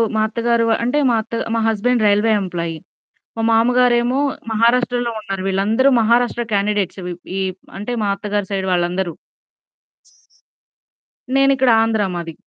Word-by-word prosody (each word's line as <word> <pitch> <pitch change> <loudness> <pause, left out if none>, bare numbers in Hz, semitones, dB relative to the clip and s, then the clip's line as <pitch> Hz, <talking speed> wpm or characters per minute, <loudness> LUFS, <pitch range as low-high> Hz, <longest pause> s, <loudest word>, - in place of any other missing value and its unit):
మా 215 - +2
అత్తగారు 235 0 0 0.2
అంటే, 250 +5 +1
మా 230 - +2
అత్త 220 - -16 0.2
మా 230 - +1
హస్బాండ్ 225 +1 +1
రైల్వే 210 +2 +3
ఎంప్లాయీ. 170 -3 -4 0.6
మా - - -1
మామగారేమో 245 +2 +3 0.3
మహారాష్ట్రలో 240 +2 +1
ఉన్నారు. 195 -2 -5
వీళ్ళందరూ 210 +7 +2
మహారాష్ట్ర 240 +1 +1
క్యాండిడేట్స్ 200 -1 -1 0.4
ఈ - - -1 0.4
అంటే, 210 +5 -5
మా - - 0
అత్తగారి 205 -1 -3
సైడ్ 190 -1 -2
వాళ్ళందరూ. 175 0 -1 2.2
నేనిక్కడ 270 -1 +3
ఆంధ్ర 225 -2 0
మాది. 165 -1 -6
225 Hz, 120 wpm, -19 LUFS, 195-240 Hz, 2.2 s, రైల్వే